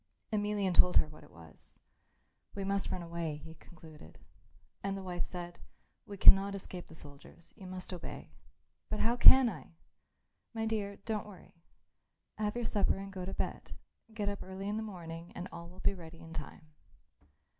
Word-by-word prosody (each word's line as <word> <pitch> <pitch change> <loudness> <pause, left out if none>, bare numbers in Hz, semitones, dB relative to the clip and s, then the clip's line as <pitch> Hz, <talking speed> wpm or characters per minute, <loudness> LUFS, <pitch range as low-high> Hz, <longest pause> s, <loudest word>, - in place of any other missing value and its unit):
Emelian 205 -3 +1
told 180 +1 +6
her - - +4
what 155 0 -13
it - - -16
was. 80 -1 -15 0.8
"We 200 - -3
must 195 0 0
run 180 -2 -3
away," 170 -2 -3
he 160 +2 -10
concluded. 155 - -14 0.6
And 195 0 -2
the 195 - -6
wife 180 -2 -2
said, 175 -1 -6 0.5
"We 200 - -7
cannot 200 +1 +8
escape 185 -2 -7
the 160 - -13
soldiers. 145 +3 -14
You 195 -4 -10
must 185 0 -6
obey." 175 - -7 0.6
"But 215 - -2
how 230 +2 +3
can 260 +1 +9
I?" 175 -5 -6 0.8
"My 225 0 -1
dear, 210 -2 -1
don't 215 -2 -2
worry. 200 -3 -13 0.9
Have 210 0 0
your 240 -1 -1
supper 205 -3 +2
and 195 0 -7
go 185 -2 -4
to 195 - -4
bed. - - -4 0.4
Get 215 -2 -3
up 200 0 -2
early 190 +1 -6
in 210 +1 -1
the - - -1
morning 170 -5 -7
and 180 - -5
all 170 0 -8
will 185 +1 -12
be - - +3
ready 165 -3 -10
in 165 0 -11
time." 155 0 -8
185 Hz, 175 wpm, -33 LUFS, 165-205 Hz, 0.9 s, can